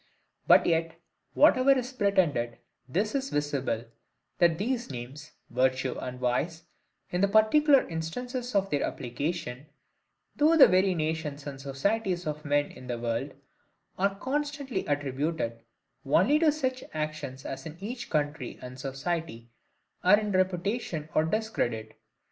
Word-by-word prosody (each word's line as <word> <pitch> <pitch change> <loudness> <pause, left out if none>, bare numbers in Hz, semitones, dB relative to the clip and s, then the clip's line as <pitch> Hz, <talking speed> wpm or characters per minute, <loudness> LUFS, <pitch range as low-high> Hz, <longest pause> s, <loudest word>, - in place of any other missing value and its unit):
But - - +7
yet, 165 0 0 0.4
whatever 275 -2 +6
is 255 +1 -3
pretended, 170 - +1 0.3
this 200 +10 0
is 275 -1 -1
visible, 140 -6 -1 0.5
that 170 -3 +4
these 235 +3 -2
names, 135 +4 -8 0.2
virtue 130 +1 +1
and 125 0 -6
vice, 160 +7 -1 0.5
in 180 - 0
the 200 - +5
particular 260 +8 +5
instances 245 +10 -4
of 195 0 +2
their 145 - +1
application, 140 +1 -3 0.7
through 315 +3 +5
the 290 - +11
several 185 0 +3
nations 155 -2 -3
and 140 -2 -7
societies 180 +7 -1
of 150 0 -4
men 145 0 +1
in 130 - -12
the 120 -1 -2
world, 120 +4 -3 0.6
are 195 +1 +2
constantly 280 -1 -3
attributed 145 -3 -2 0.4
only 190 - +4
to 315 -2 +5
such 260 -4 -2
actions 155 -4 -4
as 135 +3 -5
in 160 +1 -9
each 235 +5 -6
country 145 -4 -2
and 125 +1 -9
society 135 -3 -4 0.5
are 195 +3 +6
in 210 -1 -2
reputation 185 -3 -1
or 155 - +3
discredit. 125 - -2
160 Hz, 135 wpm, -28 LUFS, 135-215 Hz, 0.7 s, the